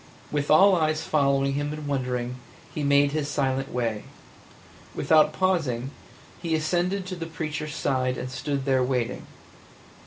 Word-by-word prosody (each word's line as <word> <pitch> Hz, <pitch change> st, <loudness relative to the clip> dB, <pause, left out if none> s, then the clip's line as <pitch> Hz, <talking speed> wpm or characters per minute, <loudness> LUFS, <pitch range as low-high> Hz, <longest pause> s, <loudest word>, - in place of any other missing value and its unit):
With 145 Hz, -1 st, -1 dB
all 190 Hz, +5 st, +7 dB
eyes 155 Hz, -2 st, +1 dB
following 140 Hz, -2 st, +2 dB
him 145 Hz, +1 st, -2 dB
and 150 Hz, 0 st, -6 dB
wondering, 125 Hz, -3 st, -2 dB, 0.4 s
he 150 Hz, -, -3 dB
made 140 Hz, 0 st, +4 dB
his 150 Hz, -1 st, -1 dB
silent 135 Hz, -2 st, -1 dB
way; 115 Hz, -4 st, -2 dB, 0.9 s
without 155 Hz, -1 st, +4 dB
pausing, 150 Hz, -9 st, 0 dB, 0.5 s
he 165 Hz, -2 st, 0 dB
ascended 175 Hz, +5 st, 0 dB
to 185 Hz, 0 st, -5 dB
the 165 Hz, -2 st, -6 dB
preacher's 155 Hz, -2 st, -4 dB
side 130 Hz, -1 st, 0 dB
and 130 Hz, -, -5 dB
stood 135 Hz, +2 st, -3 dB
there 135 Hz, -2 st, +2 dB
waiting. 125 Hz, -2 st, -1 dB
145 Hz, 145 wpm, -26 LUFS, 130-155 Hz, 0.9 s, all